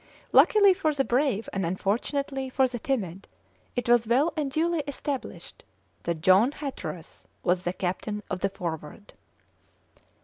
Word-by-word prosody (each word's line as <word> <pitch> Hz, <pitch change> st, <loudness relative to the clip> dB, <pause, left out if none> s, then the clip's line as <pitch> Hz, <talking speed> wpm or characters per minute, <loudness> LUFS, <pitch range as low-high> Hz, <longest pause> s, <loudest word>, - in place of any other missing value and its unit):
Luckily 405 Hz, -3 st, +6 dB
for 315 Hz, -5 st, 0 dB
the 270 Hz, -1 st, +1 dB
brave 245 Hz, -4 st, +1 dB
and 195 Hz, -, -1 dB
unfortunately 260 Hz, -, -1 dB
for 260 Hz, 0 st, +3 dB
the 245 Hz, -1 st, -6 dB
timid, 200 Hz, -8 st, -3 dB, 0.5 s
it 245 Hz, -, -2 dB
was 240 Hz, -1 st, +4 dB
well 270 Hz, +8 st, +3 dB
and 300 Hz, -3 st, -1 dB
duly 330 Hz, +4 st, 0 dB
established 280 Hz, -1 st, -5 dB, 0.4 s
that 170 Hz, -2 st, -3 dB
John 195 Hz, -, +5 dB
Hatteras 265 Hz, -, -7 dB, 0.2 s
was 180 Hz, +1 st, +1 dB
the 175 Hz, -, 0 dB
captain 190 Hz, +3 st, -3 dB
of 185 Hz, -, -3 dB
the 195 Hz, -, 0 dB
Forward. 170 Hz, 0 st, -7 dB
240 Hz, 140 wpm, -27 LUFS, 185-280 Hz, 0.5 s, Luckily